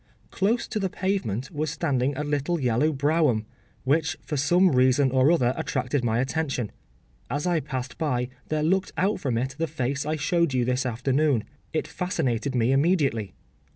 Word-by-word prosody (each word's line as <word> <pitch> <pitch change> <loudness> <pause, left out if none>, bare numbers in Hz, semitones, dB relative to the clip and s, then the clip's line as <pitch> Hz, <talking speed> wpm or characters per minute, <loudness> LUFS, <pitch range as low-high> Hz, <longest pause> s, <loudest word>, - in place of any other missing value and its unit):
Close 220 +5 0
to 215 - -2
the 190 -2 -1
pavement 155 - -2
was 155 -1 -2
standing 140 -3 0
a 150 - -1
little 145 +3 -1
yellow 130 +4 +2
brougham, 145 -5 +1 0.4
which, 150 +4 +1
for 150 - -4
some 175 +6 +4
reason 130 +1 +4
or 130 +4 +4
other, 125 -7 +3
attracted 130 +1 -1
my 115 -1 +1
attention. 130 -3 -1 0.6
As 145 +6 -2
I 175 -2 +2
passed 130 -2 -5
by 125 -6 0 0.2
there 155 -1 -1
looked 190 +4 +1
out 195 +1 +1
from 130 -8 -1
it 130 +3 -2
the 165 - 0
face 140 -2 -2
I 155 +1 -1
showed 170 -1 +1
you 125 -1 +2
this 125 +1 0
afternoon. 130 +1 +1 0.3
It 155 - -1
fascinated 140 -7 -2
me 120 +1 +2
immediately. 135 - +1
140 Hz, 170 wpm, -25 LUFS, 125-160 Hz, 0.6 s, some